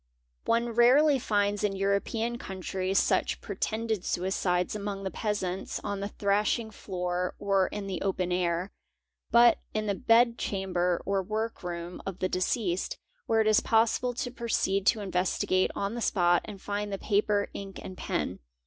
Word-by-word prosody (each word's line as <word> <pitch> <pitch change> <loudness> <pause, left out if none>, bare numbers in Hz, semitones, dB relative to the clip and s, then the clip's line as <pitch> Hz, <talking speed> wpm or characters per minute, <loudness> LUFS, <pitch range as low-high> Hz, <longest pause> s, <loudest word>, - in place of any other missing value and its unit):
One 235 +1 +2
rarely 260 +5 +5
finds 205 -2 0
in 200 -2 +1
European 210 +4 0
countries 190 -1 -3
such - - +2
pretended 220 -3 -2
suicides 180 0 0
among 200 -1 -4
the 190 - -3
peasants 195 -3 -2
on 200 -1 -3
the 200 +1 -3
ihrashing 210 +2 +1
floor 180 -2 -3
or 195 -2 +2
in 205 -1 -5
the 190 -3 -4
open 185 -2 -1
air, 180 +1 0 0.6
but 235 -1 +6 0.2
in 215 0 0
the 205 - +1
bed 230 +4 +3
chamber 180 -3 -1
or 195 0 +1
work 220 +4 -3
room 175 -1 -5
f 195 -2 -4
the 185 - 0
deceased, 185 0 -1 0.3
where 225 0 +3
it 220 - +1
is 215 -1 +5
possible 230 +2 +2
to 245 0 -3
proceed 205 -5 0
to 220 - +4
investigate 185 0 +1
on 200 +2 -2
the 240 - -4
spot 175 -5 +3
nd 200 -2 -10
find 205 0 -3
the 195 - -2
paper, 205 0 +1
ink, 195 -1 -7
and 185 - -7
pen. - - -3
200 Hz, 160 wpm, -29 LUFS, 185-220 Hz, 0.6 s, but